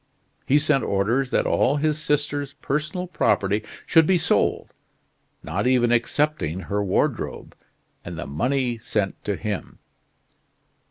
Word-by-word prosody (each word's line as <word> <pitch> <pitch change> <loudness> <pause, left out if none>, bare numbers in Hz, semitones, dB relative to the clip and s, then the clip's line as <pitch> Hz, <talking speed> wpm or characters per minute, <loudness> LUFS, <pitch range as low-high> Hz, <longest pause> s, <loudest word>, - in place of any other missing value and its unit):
He 140 - +5
sent 150 -2 +2
orders 115 +7 +1
that - - +1
all 140 - +2
his 155 +1 0
sister's 145 -2 -1
personal 150 +6 -2
property 105 - +1 0.2
should 160 -2 +5
be 190 - +4
sold - - 0 0.7
not - - -1
even 125 -2 +3
excepting 120 - 0
her 105 +1 -2
wardrobe 95 - -1 0.5
and 85 -1 -7
the 85 - -5
money 120 - -1
sent 105 -3 -2
to 105 - 0
him." 105 -4 -5
130 Hz, 125 wpm, -24 LUFS, 105-150 Hz, 0.7 s, He